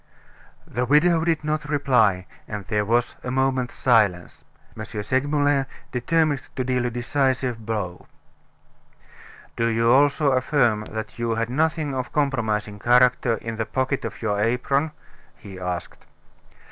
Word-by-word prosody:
The 125 - -2
widow 160 +4 +4
did 165 -2 0
not 150 -1 -2
reply, 125 -10 +2 0.2
and 105 -3 -6
there 105 +1 0
was 120 +3 +1
a - - -4
moment's 130 -1 0
silence. 105 -8 +1 0.3
M. - - -6
Segmuller 140 +5 0 0.2
determined 150 +3 +1
to 130 - -1
deal 125 -1 0
a - - -1
decisive 125 -1 -1
blow. 100 -5 -4 1.5
"Do 115 - +1
you 115 0 +2
also 140 +2 +4
affirm 125 -5 +1
that 110 +1 -7
you 115 -1 0
had 115 +1 -2
nothing 155 +1 0
of 130 -1 -2
a - - -21
compromising 110 -8 -1
character 125 0 +3
in 115 0 -6
the 110 - -1
pocket 130 +1 -1
of 115 0 -6
your 105 -2 0
apron?" 125 +7 +1 0.5
he 95 -2 -11
asked. 90 -1 -5
125 Hz, 140 wpm, -23 LUFS, 110-140 Hz, 1.5 s, widow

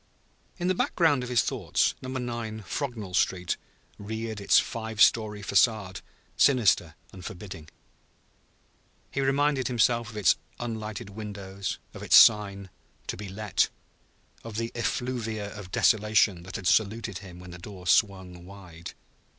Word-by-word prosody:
In 175 -1 -2
the 185 - +3
background 165 -6 +2
of 125 - -5
his 120 -3 +3
thoughts - - 0
Number 130 0 -4
9, 115 -3 -5
Frognall 110 -4 -4
Street, 90 -1 +1 0.4
reared 110 +1 -5
its 100 - +5
five 110 -1 -2
story 105 -2 +4
façade, 100 -2 +2 0.3
sinister 125 -7 +3 0.2
and 95 - -11
forbidding. 85 -4 -8 1.4
He 135 - -1
reminded 135 0 +1
himself 120 -1 +2
of 110 - -9
its 100 -5 +4 0.2
unlighted 110 -4 -5
windows; 100 -3 -5 0.2
of - - -10
its - - +4
sign, 100 -2 +5 0.3
"To - - -4
be 100 -2 -7
let"; 105 +1 0 0.7
of 115 -2 -7
the 115 0 -2
effluvia 115 -4 -3
of 100 -3 -9
desolation 105 -4 +3
that 95 - -9
had 95 - -5
saluted 110 +1 +1
him 90 -3 -11
when 90 0 -11
the 90 - -10
door 95 0 -10
swung 95 -3 +1
wide. 90 -3 -11
105 Hz, 140 wpm, -27 LUFS, 95-115 Hz, 1.4 s, its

